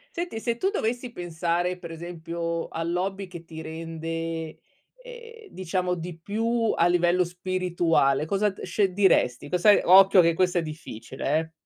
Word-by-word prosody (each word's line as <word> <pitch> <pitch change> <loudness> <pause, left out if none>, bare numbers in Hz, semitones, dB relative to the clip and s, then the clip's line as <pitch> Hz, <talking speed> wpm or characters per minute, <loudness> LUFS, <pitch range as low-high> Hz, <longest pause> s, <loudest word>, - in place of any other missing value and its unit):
Senti, 345 -9 -4
se 230 0 -2
tu 380 - +1
dovessi 245 - -2
pensare 175 0 -2
per 170 -2 -9
esempio 170 0 -4
all'hobby 180 +4 -3
che 175 -2 -10
ti 160 -1 -9
rende, 165 0 -5 0.5
ehm, 465 -3 -12
diciamo 180 0 -2
di 170 0 -7
più 225 +5 0
a 170 - +3
livello 175 +1 +3
spirituale. 175 -5 0
Cosa 200 +5 +1
d 195 - -11
sce 195 -3 0
diresti? 180 -9 +2
Cosa 180 +4 +5
occhio 190 +1 +7
che 170 0 +3
questa 180 0 +1
è - - 0
difficile, 150 -2 -4
eh. 160 0 -6
175 Hz, 150 wpm, -26 LUFS, 165-195 Hz, 0.5 s, occhio